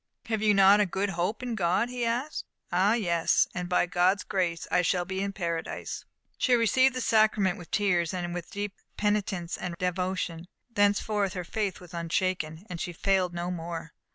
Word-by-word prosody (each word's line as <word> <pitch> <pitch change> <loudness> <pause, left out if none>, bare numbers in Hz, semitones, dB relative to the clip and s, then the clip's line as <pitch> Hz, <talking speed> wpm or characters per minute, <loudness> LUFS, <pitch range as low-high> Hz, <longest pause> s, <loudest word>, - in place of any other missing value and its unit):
"Have 220 -2 -1
you 210 -1 +4
not 195 +1 +7
a 205 - +3
good 195 +2 -1
hope 180 +7 -2
in 245 -2 -2
God?" 195 +3 +1
he 250 -1 -3
asked. 245 +6 -2 0.3
"Ah, 195 +5 +3
yes, 170 -7 +2
and 180 -1 -4
by 180 - +3
God's 180 +2 +2
grace, 175 -3 -1
I 180 - +4
shall 180 0 +1
be 190 +1 -3
in 200 0 -1
Paradise." 170 -4 -4 0.3
She 250 - +4
received 255 +3 +4
the 255 - -2
sacrament 215 -5 +3
with 175 - -11
tears, 180 -5 +1
and 175 -1 -3
with 175 -1 -5
deep 205 0 -4 0.2
penitence 200 -4 -1
and 175 -1 -4
devotion. 180 -2 -2 0.3
Thenceforth 205 -1 +2
her 180 - -4
faith 200 +2 -2
was 180 -1 -14
unshaken, 170 0 -1
and 175 -2 -6
she 175 - -3
failed 185 0 +1
no 175 +1 -2
more. 165 -2 -5
185 Hz, 180 wpm, -28 LUFS, 175-205 Hz, 0.3 s, not